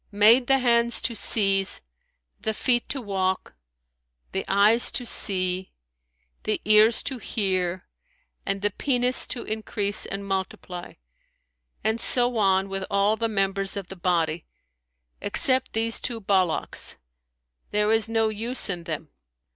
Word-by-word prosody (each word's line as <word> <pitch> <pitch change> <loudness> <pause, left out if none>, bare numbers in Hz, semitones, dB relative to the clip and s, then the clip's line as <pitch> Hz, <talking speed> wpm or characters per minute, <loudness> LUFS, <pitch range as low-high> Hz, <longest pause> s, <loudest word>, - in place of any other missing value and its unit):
made 220 +5 +4
the 270 - +4
hands 235 -2 +1
to 235 - -3
seize, 195 -3 +3 0.6
the 220 - -3
feet 240 +1 -1
to 275 - -2
walk, 190 -4 -3 0.8
the 190 - -3
eyes 210 +4 +3
to 245 - -3
see, 185 -4 +2 0.7
the - - -2
ears 215 +2 +4
to 265 -3 -4
hear 185 -5 -2 0.6
and 195 0 -4
the 205 - 0
penis 250 +2 +1
to 245 - -4
increase 215 -1 +1
and 200 0 -6
multiply; 190 -2 -6 0.9
and 220 +2 -1
so 245 -1 +3
on 195 -2 +1
with 195 0 -5
all 200 +2 +1
the 230 0 -3
members 195 -1 -1
of 195 -3 -7
the 190 - -9
body, 170 -3 -2 0.7
except 260 0 +2
these 225 +1 0
two 235 -2 -4
ballocks; 190 -5 0 0.7
there 210 +1 0
is 225 0 +2
no 225 -1 0
use 225 +1 -1
in 175 -2 -7
them.' 155 -1 -6
205 Hz, 135 wpm, -24 LUFS, 190-230 Hz, 0.9 s, made